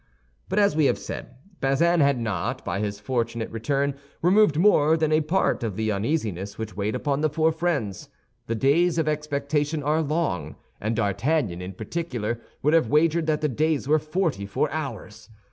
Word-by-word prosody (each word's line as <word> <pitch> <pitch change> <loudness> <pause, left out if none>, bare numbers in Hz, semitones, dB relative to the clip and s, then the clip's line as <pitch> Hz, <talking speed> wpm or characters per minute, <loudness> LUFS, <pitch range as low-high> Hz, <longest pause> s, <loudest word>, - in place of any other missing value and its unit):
But, - - -2
as 200 -7 +4
we 155 -2 +3
have - - +2
said, 125 - -7 0.2
Bazin 165 +6 +2
had 140 -3 +3
not, 105 -7 -3
by 85 +3 -2
his 100 -1 -3
fortunate 115 0 -2
return, 140 +5 0 0.3
removed 185 -3 +4
more 160 -4 +4
than 155 -1 +1
a 155 0 +4
part 170 +6 +1
of 110 -5 -3
the 110 +1 0
uneasiness 100 - -2
which 110 -3 -6
weighed 105 +2 -1
upon 145 -1 -1
the 155 - +2
four 160 +2 +2
friends. 155 - -2 0.4
The 115 - -1
days 160 +8 +3
of 160 -2 +1
expectation 150 0 -1
are 155 +3 +2
long, 145 - -1 0.2
and 110 +2 -1
D'Artagnan, 110 - 0
in 90 +1 -6
particular, 120 - -4 0.2
would 150 +3 +3
have 160 -9 +3
wagered 160 +2 +3
that 155 -1 +1
the 155 - +2
days 150 +1 0
were 155 +2 +4
forty 155 - -1
four 120 +9 -1
hours. 115 -7 -6
145 Hz, 180 wpm, -25 LUFS, 110-155 Hz, 0.4 s, as